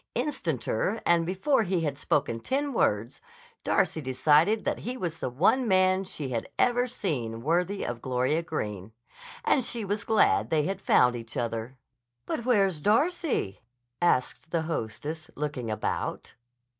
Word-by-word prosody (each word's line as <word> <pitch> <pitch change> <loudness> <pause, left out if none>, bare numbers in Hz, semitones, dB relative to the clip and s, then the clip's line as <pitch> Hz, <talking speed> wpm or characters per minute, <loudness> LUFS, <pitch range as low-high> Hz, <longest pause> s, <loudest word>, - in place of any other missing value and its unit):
Instanter 215 - -1
and 170 -1 +3
before 195 +9 +2
he 185 -4 0
had 145 -4 -1
spoken 140 -4 0
ten 280 - -1
words, 115 - 0 0.4
Darcy 160 -3 +1
decided 150 - +3
that - - -1
he 250 +3 -4
was 170 -6 -4
the - - -2
one 195 - +2
man 185 0 +3
she 150 -7 -5
had 115 -3 -3
ever 245 0 +3
seen 120 - -3
worthy 180 +6 0
of 120 -1 -4
Gloria 130 +5 0
Greene. 105 - -5 0.5
And 265 - +3
she 230 -2 -2
was 205 +1 -2
glad 220 - +3
they 155 -2 +2
had 195 +4 -3
found 125 -9 +4
each 115 -2 -7
other. 115 +2 -3 0.5
"But 235 - -3
where's 195 -10 +2
Darcy?" 275 - +1 0.4
asked 160 -1 +1
the 165 -1 0
hostess, 155 +2 -4
looking 145 -6 -3
about. 110 - -3
165 Hz, 145 wpm, -28 LUFS, 125-205 Hz, 0.5 s, found